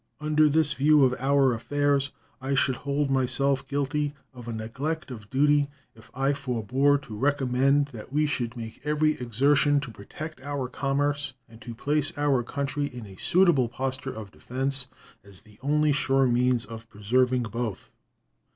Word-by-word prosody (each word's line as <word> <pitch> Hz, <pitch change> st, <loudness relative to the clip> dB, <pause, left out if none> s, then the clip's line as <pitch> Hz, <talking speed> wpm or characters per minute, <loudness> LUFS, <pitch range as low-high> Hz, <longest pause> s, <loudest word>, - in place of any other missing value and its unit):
Under 150 Hz, 0 st, +3 dB
this 150 Hz, 0 st, +2 dB
view 150 Hz, +1 st, +4 dB
of 130 Hz, -1 st, +4 dB
our 135 Hz, -1 st, +3 dB
affairs, 145 Hz, +3 st, 0 dB, 0.3 s
I 135 Hz, +1 st, -1 dB
should 130 Hz, -1 st, +2 dB
hold 140 Hz, 0 st, -1 dB
myself 135 Hz, +1 st, +1 dB
guilty 145 Hz, +1 st, -1 dB, 0.2 s
of 120 Hz, -2 st, -11 dB
a -, -, -3 dB
neglect 130 Hz, +8 st, -4 dB
of 105 Hz, -4 st, -9 dB
duty 145 Hz, +1 st, +3 dB, 0.2 s
if 110 Hz, -, -18 dB
I 135 Hz, +2 st, +1 dB
forbore 135 Hz, +1 st, +1 dB
to 110 Hz, -6 st, -8 dB
recommend 140 Hz, +2 st, +2 dB
that 115 Hz, -2 st, -10 dB
we 150 Hz, +2 st, +2 dB
should 125 Hz, -5 st, -2 dB
make 115 Hz, -1 st, -8 dB
every 150 Hz, +1 st, +2 dB
exertion 140 Hz, +5 st, +3 dB
to 135 Hz, -5 st, -7 dB
protect 150 Hz, +9 st, -9 dB
our 140 Hz, -2 st, -3 dB
commerce 140 Hz, +1 st, -1 dB
and 115 Hz, +1 st, -16 dB
to 120 Hz, -2 st, -8 dB
place 150 Hz, +5 st, +1 dB
our 145 Hz, -3 st, +2 dB
country 140 Hz, +3 st, -2 dB
in 125 Hz, -5 st, -9 dB
a 95 Hz, -2 st, -12 dB
suitable 170 Hz, -10 st, +3 dB
posture 130 Hz, +2 st, -3 dB
of 105 Hz, -3 st, -8 dB
defense 135 Hz, +1 st, -3 dB, 0.4 s
as 100 Hz, -2 st, -15 dB
the 105 Hz, -1 st, -20 dB
only 150 Hz, +2 st, +2 dB
sure 135 Hz, -1 st, +2 dB
means 125 Hz, -1 st, +2 dB
of 115 Hz, +1 st, -10 dB
preserving 125 Hz, +4 st, +1 dB
both. 115 Hz, -2 st, -5 dB
135 Hz, 160 wpm, -26 LUFS, 120-145 Hz, 0.4 s, view